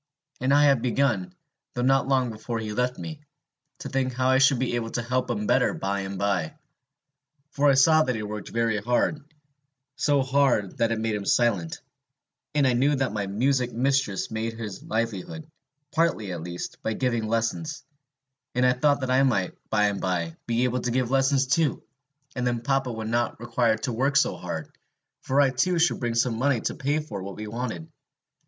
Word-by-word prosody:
And 130 Hz, +2 st, 0 dB
I 145 Hz, +1 st, +5 dB
had 140 Hz, -4 st, +4 dB
begun, 140 Hz, -, 0 dB, 0.4 s
though 125 Hz, -, -1 dB
not 135 Hz, 0 st, +3 dB
long 130 Hz, -3 st, +2 dB
before 115 Hz, +2 st, -5 dB
he 110 Hz, -1 st, -4 dB
left 125 Hz, +2 st, 0 dB
me, 155 Hz, -2 st, -7 dB, 0.6 s
to -, -, -5 dB
think 130 Hz, -1 st, -1 dB
how 130 Hz, +1 st, +1 dB
I 130 Hz, 0 st, +4 dB
should 135 Hz, 0 st, +5 dB
be 125 Hz, 0 st, -1 dB
able 115 Hz, -1 st, -2 dB
to 120 Hz, -, -3 dB
help 125 Hz, +1 st, -1 dB
him 105 Hz, -3 st, -2 dB
better -, -, +2 dB
by 100 Hz, +1 st, -2 dB
and 95 Hz, 0 st, -5 dB
by. 95 Hz, -5 st, -1 dB, 1.0 s
For 145 Hz, 0 st, +3 dB
I 135 Hz, -, +5 dB
saw 155 Hz, +4 st, +6 dB
that 125 Hz, -5 st, 0 dB
he 110 Hz, -, -4 dB
worked 105 Hz, -1 st, -6 dB
very 115 Hz, -2 st, 0 dB
hard, 125 Hz, +7 st, 0 dB, 0.7 s
so 145 Hz, -2 st, +2 dB
hard 130 Hz, -7 st, +1 dB
that 115 Hz, 0 st, +2 dB
it 115 Hz, -, 0 dB
made 110 Hz, 0 st, -1 dB
him 105 Hz, -1 st, -3 dB
silent; 100 Hz, -9 st, +1 dB, 0.7 s
and 145 Hz, -2 st, +3 dB
I 130 Hz, -, +3 dB
knew 140 Hz, +4 st, +3 dB
that 130 Hz, -5 st, -1 dB
my 100 Hz, -2 st, -2 dB
music 125 Hz, +5 st, 0 dB
mistress 130 Hz, -4 st, 0 dB
made 110 Hz, +1 st, -2 dB
her 115 Hz, -1 st, -5 dB
livelihood, 115 Hz, -, -3 dB, 0.5 s
partly 160 Hz, -, 0 dB
at 85 Hz, -2 st, -5 dB
least, 85 Hz, +1 st, -6 dB
by 110 Hz, -, -1 dB
giving 120 Hz, -2 st, -1 dB
lessons; 115 Hz, +8 st, -2 dB, 0.7 s
and 125 Hz, +1 st, +3 dB
I 125 Hz, -, +5 dB
thought 145 Hz, +2 st, +2 dB
that 130 Hz, -1 st, -1 dB
I 130 Hz, +1 st, +4 dB
might, 110 Hz, -9 st, +1 dB, 0.2 s
by 105 Hz, -, +2 dB
and 100 Hz, -1 st, -1 dB
by, 85 Hz, -3 st, -1 dB
be 120 Hz, +1 st, +1 dB
able 125 Hz, 0 st, +1 dB
to 120 Hz, -, -2 dB
give 125 Hz, 0 st, 0 dB
lessons 135 Hz, 0 st, +3 dB
too, 140 Hz, +2 st, +1 dB, 0.5 s
and 125 Hz, -1 st, -1 dB
then 120 Hz, -1 st, -1 dB
papa 135 Hz, -1 st, 0 dB
would 110 Hz, -1 st, -5 dB
not 120 Hz, -1 st, 0 dB
require 120 Hz, -1 st, +1 dB
to 125 Hz, +2 st, -3 dB
work 135 Hz, +5 st, 0 dB
so -, -, +2 dB
hard, -, -, -6 dB, 0.5 s
for 135 Hz, +2 st, 0 dB
I 140 Hz, -2 st, +5 dB
too 170 Hz, +8 st, +1 dB
should 165 Hz, +1 st, +2 dB
bring 120 Hz, -2 st, -2 dB
home 115 Hz, -3 st, -3 dB
money 135 Hz, -2 st, +2 dB
to -, -, -2 dB
pay 145 Hz, +2 st, -1 dB
for 105 Hz, -10 st, -7 dB
what 95 Hz, 0 st, -7 dB
we 110 Hz, -, -6 dB
wanted. 110 Hz, -7 st, -5 dB
125 Hz, 200 wpm, -26 LUFS, 110-135 Hz, 1.0 s, saw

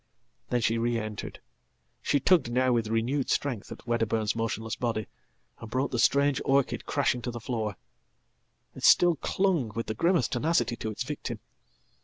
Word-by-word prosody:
Then 125 Hz, -1 st, +1 dB
she 115 Hz, +1 st, +1 dB
re 120 Hz, 0 st, +1 dB
entered. 110 Hz, -2 st, -5 dB, 0.6 s
She 145 Hz, -, +1 dB
tugged 155 Hz, -4 st, +3 dB
now 130 Hz, +1 st, +2 dB
with 115 Hz, -2 st, +1 dB
renewed 120 Hz, +5 st, 0 dB
strength 125 Hz, -8 st, -1 dB
atWedderburn's 115 Hz, -2 st, -1 dB
motionless 115 Hz, -1 st, -2 dB
body, 115 Hz, -3 st, -2 dB, 0.5 s
and 115 Hz, -, -9 dB
brought 130 Hz, +4 st, -1 dB
the 120 Hz, -, -1 dB
strange 140 Hz, +2 st, +3 dB
orchid 135 Hz, -1 st, +1 dB
crashing 135 Hz, -4 st, +1 dB
tothe 120 Hz, 0 st, -4 dB
floor. 110 Hz, -3 st, -3 dB, 1.0 s
It -, -, -11 dB
still 175 Hz, -1 st, +6 dB
clung 175 Hz, -, 0 dB
with 115 Hz, -, -2 dB
the 110 Hz, -, -3 dB
grimmest 165 Hz, -, +1 dB
tenacity 120 Hz, -3 st, +1 dB
to 110 Hz, -, -4 dB
its 110 Hz, +3 st, -3 dB
victim. 125 Hz, -4 st, -5 dB
120 Hz, 155 wpm, -28 LUFS, 115-140 Hz, 1.0 s, still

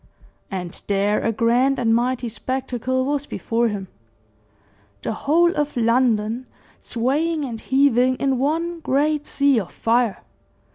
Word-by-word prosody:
And 180 Hz, -3 st, -6 dB
there 200 Hz, +1 st, +1 dB
a 230 Hz, -, +1 dB
grand 245 Hz, +5 st, +2 dB
and 230 Hz, -2 st, +2 dB
mighty 245 Hz, +1 st, 0 dB
spectacle 255 Hz, +2 st, -2 dB
was 290 Hz, +1 st, -1 dB
before 235 Hz, +1 st, -1 dB
him 200 Hz, -3 st, -4 dB, 1.2 s
the -, -, -2 dB
whole 335 Hz, +9 st, +2 dB
of 295 Hz, -3 st, -2 dB
London 230 Hz, 0 st, +1 dB, 0.3 s
swaying 295 Hz, +6 st, -1 dB
and 230 Hz, -4 st, -6 dB
heaving 260 Hz, -2 st, +3 dB
in 270 Hz, -1 st, 0 dB
one 330 Hz, +5 st, -1 dB
great 295 Hz, 0 st, 0 dB
sea 280 Hz, -3 st, +3 dB
of 185 Hz, -4 st, -6 dB
fire. 230 Hz, -2 st, 0 dB
255 Hz, 130 wpm, -22 LUFS, 230-280 Hz, 1.2 s, heaving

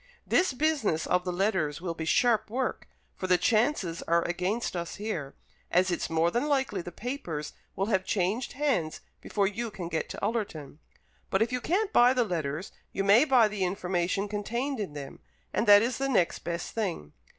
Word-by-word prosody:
"This 370 Hz, -, +3 dB
business 265 Hz, -, +1 dB
of 180 Hz, 0 st, +1 dB
the 180 Hz, -, -1 dB
letters 175 Hz, -6 st, 0 dB
will 170 Hz, -1 st, -3 dB
be 165 Hz, -1 st, -5 dB
sharp 225 Hz, +5 st, +3 dB
work, 255 Hz, +3 st, -2 dB, 0.3 s
for 185 Hz, -, -4 dB
the 180 Hz, -1 st, +5 dB
chances 215 Hz, -, +1 dB
are 170 Hz, 0 st, +3 dB
against 185 Hz, +6 st, -2 dB
us 170 Hz, -1 st, -4 dB
here, 175 Hz, -10 st, -4 dB, 0.3 s
as 185 Hz, +1 st, +3 dB
it's 175 Hz, -, -2 dB
more 165 Hz, +1 st, +2 dB
than 240 Hz, +8 st, 0 dB
likely 265 Hz, -9 st, 0 dB
the 175 Hz, -, -8 dB
papers 175 Hz, -, -5 dB, 0.2 s
will 195 Hz, -, 0 dB
have 190 Hz, -3 st, +1 dB
changed 200 Hz, +6 st, -1 dB
hands 255 Hz, -, -1 dB, 0.2 s
before 200 Hz, -2 st, 0 dB
you 225 Hz, +4 st, -2 dB
can 190 Hz, -5 st, -6 dB
get 160 Hz, -1 st, -2 dB
to -, -, -7 dB
Ullerton. 195 Hz, -, -3 dB, 0.5 s
But 195 Hz, +3 st, +3 dB
if 230 Hz, -, -3 dB
you 250 Hz, 0 st, -1 dB
can't 395 Hz, -, 0 dB
buy 245 Hz, +2 st, +6 dB
the 250 Hz, -, +3 dB
letters, 160 Hz, -2 st, -3 dB, 0.2 s
you 195 Hz, -, -1 dB
may 205 Hz, +8 st, +6 dB
buy 255 Hz, -6 st, +5 dB
the 210 Hz, -2 st, -3 dB
information 180 Hz, +1 st, -1 dB
contained 235 Hz, +6 st, -2 dB
in 195 Hz, -8 st, -4 dB
them, 140 Hz, -2 st, -8 dB, 0.3 s
and 225 Hz, -, 0 dB
that 205 Hz, +1 st, +8 dB
is 240 Hz, +2 st, -1 dB
the 275 Hz, 0 st, 0 dB
next 190 Hz, -9 st, +2 dB
best 170 Hz, 0 st, -4 dB
thing. 180 Hz, -, -3 dB
200 Hz, 190 wpm, -28 LUFS, 175-240 Hz, 0.5 s, that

